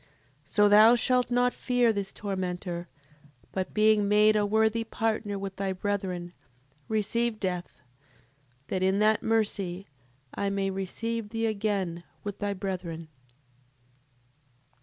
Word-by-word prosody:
So 205 +7 +4
thou 215 +3 +7
shalt 250 +1 +2
not 245 0 +2
fear 245 -2 +2
this 200 -2 -3
tormentor, 180 -3 -4 0.6
but 190 -1 -3
being 215 -1 +3
made 210 +1 +5
a 205 -1 +2
worthy 220 +2 +2
partner 225 -2 -2
with 195 -1 -6
thy 195 -1 -1
brethren, 185 -3 -3 0.5
receive 220 +1 0
death, 180 -3 -4 0.9
that 185 - -1
in 190 +1 +2
that 215 +1 +3
mercy 200 -4 -1 0.5
I 200 - -1
may 195 -1 -1
receive 210 +4 -3
thee 225 +1 -2
again 200 -5 -1 0.2
with 205 -1 -5
thy 205 -1 -2
brethren. 180 -4 -5
205 Hz, 120 wpm, -28 LUFS, 190-220 Hz, 0.9 s, thou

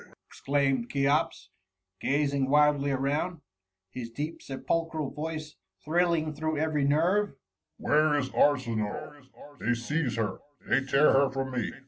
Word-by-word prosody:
^ - - -14 0.2
exclaimed 135 -3 0
Cheops, 140 -8 0 0.5
gazing 140 -1 +1
wildly 145 -1 +4
around 145 +5 -1 0.2
— 95 0 -59
his 120 0 -6
deep 150 +7 -5
sepulchral 155 +2 -2
voice 155 0 -5 0.3
thrill 170 +2 +2
ing 155 -1 -2
through 155 +1 -2
every 150 -2 +1
nerve: 175 +6 +2 0.2
— - - -58
Where 155 0 +3
is 130 -2 -1
ArsiniSe? 130 +1 0 0.3
They 120 +4 +1
seize 130 +3 -1
her! 105 -4 -2 0.3
They 135 - +2
tear 135 +2 +4
her 135 0 +4
from 135 0 -3
me. 125 -3 -2
145 Hz, 140 wpm, -28 LUFS, 130-155 Hz, 0.5 s, wildly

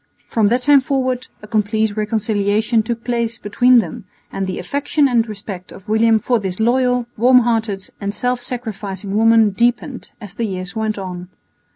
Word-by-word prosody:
From 220 -3 +1
that 245 +4 +1
time 285 -1 +6
forward 255 -1 -1 0.2
a - - -9
complete 215 0 0
reconciliation 215 +1 0
took 230 +1 -4
place 235 -2 -2
between 245 +5 +3
them, 180 -5 -1 0.3
and 195 -1 -3
the 185 - -4
affection 285 +1 0
and 235 -3 +1
respect 195 -3 -7
of 195 +2 -13
William 225 +1 +4
for 240 +2 0
this 190 -2 -4
loyal, 250 +1 +2
warm 250 +3 +6
hearted 225 -5 -1
and 200 0 -2
self 245 +3 -1
sacrificing 210 -5 -5
woman 225 -1 +5
deepened 240 +5 -1
as 205 -5 -10
the 230 +2 -2
years 185 -1 -5
went 220 -1 -2
on. 180 -2 -6
220 Hz, 170 wpm, -19 LUFS, 205-245 Hz, 0.3 s, time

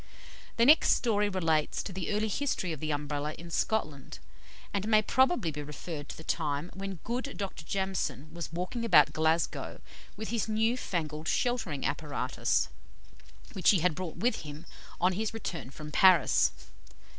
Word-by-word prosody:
The 235 - +5
next 305 +5 +7
story 210 -3 +1
relates 165 -5 0
to 190 - -6
the 185 +1 -3
early 210 +1 +1
history 205 - -1
of 155 - -7
the 155 - -3
Umbrella 145 0 -2
in 170 0 -10
Scotland, 155 - -1 0.6
and 200 +1 -1
may 215 -1 +5
probably 260 - +2
be 150 0 -5
referred 150 +1 -7
to - - -7
the 160 - -10
time 155 0 -2
when 195 +1 -5
good 250 +5 -3
Dr. 195 -5 -5
Jamieson 160 -6 -2
was 170 -3 -6
walking 180 +8 -3
about 220 -7 +6
Glasgow 160 +1 0 0.4
with 220 - -5
his 225 -1 -1
new 220 +2 +2
fangled 155 -9 -3
sheltering 225 - 0
apparatus, 145 -4 0 0.9
which 190 - +3
he 190 -6 +5
had 180 -1 +3
brought 170 +1 -5
with 235 +8 +1
him 150 +1 -8 0.3
on 185 +1 +3
his 220 +3 -2
return 165 - -5
from 150 +2 -9
Paris. 185 +1 +5
180 Hz, 160 wpm, -30 LUFS, 155-215 Hz, 0.9 s, next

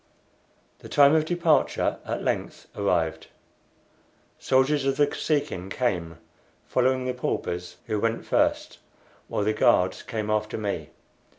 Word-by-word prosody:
The - - -12
time 140 0 +6
of 155 -1 +3
departure 170 -1 +1
at - - -3
length - - -3
arrived. 90 -5 0 1.1
Soldiers 135 +2 +2
of 135 0 0
the 145 - +5
Kosekin 145 - -2
came, 90 -8 -2 0.5
following 130 0 +1
the 125 - -1
paupers, 90 -7 -3
who 105 - -1
went 115 +1 -1
first, - - 0 0.5
while - - -1
the 110 +1 +1
guards 90 -3 +3
came 110 -3 -4
after 105 0 -1
me. 100 -8 -3
115 Hz, 125 wpm, -26 LUFS, 95-135 Hz, 1.1 s, time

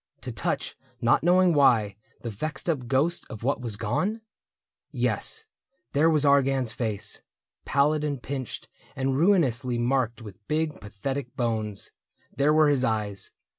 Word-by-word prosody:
To - - -5
touch, - - -2 0.2
not - - +3
knowing 180 +1 +4
why, 115 -9 +4 0.3
the 115 - -4
vexed 155 - -5
up 140 -8 -1
ghost 140 +7 +1
Of 110 - -8
what 135 +1 0
was 115 -4 -3
gone? 185 - -1 0.7
Yes, 445 0 -1 0.5
there 155 +3 +4
was 150 -2 +2
Argan's 135 -3 +3
face. 110 -3 -4 0.4
Pallid 150 +2 +2
and 145 -3 -2
pinched 130 -1 -5 0.3
and 135 0 0
ruinously 135 - +2
marked 120 -1 0
With 105 -2 -12
big 155 0 -1
pathetic 125 +6 -5
bones; 110 -4 -2 0.4
there 140 +3 +3
were 155 -1 +5
his 140 -3 +2
eyes. 105 -4 -2
135 Hz, 140 wpm, -26 LUFS, 115-150 Hz, 0.7 s, were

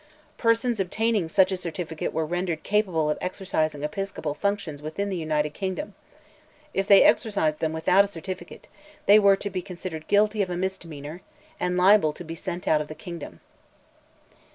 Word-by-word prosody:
Persons 230 0 +2
obtaining 205 -1 0
such 190 +3 +4
a 190 - -1
certificate 170 -3 -4
were 160 0 -1
rendered 175 -1 -2
capable 190 -7 +1
of 150 - -1
exercising 155 -5 -2
episcopal 155 -1 -3
functions 190 -5 -2
within 180 +7 -3
the - - -1
United 155 -3 -1
Kingdom; 190 +2 -4 0.8
if 195 0 -1
they 200 - +8
exercised 160 -9 +2
them 160 - 0
without 170 +5 +4
a - - -3
certificate, 185 -1 -8 0.4
they 205 +2 +8
were 200 -1 +6
to 200 +1 -5
be 185 -1 -2
considered 175 -4 -7
guilty 210 +1 +3
of 190 - -1
a 175 - -3
misdemeanor, 170 -4 -5 0.4
and 180 0 0
liable 185 -4 +5
to 175 - -9
be 165 -1 -7
sent 175 +2 -5
out 155 -1 +3
of 150 - -5
the 155 - -8
kingdom. 165 - -9
180 Hz, 170 wpm, -25 LUFS, 155-200 Hz, 0.8 s, they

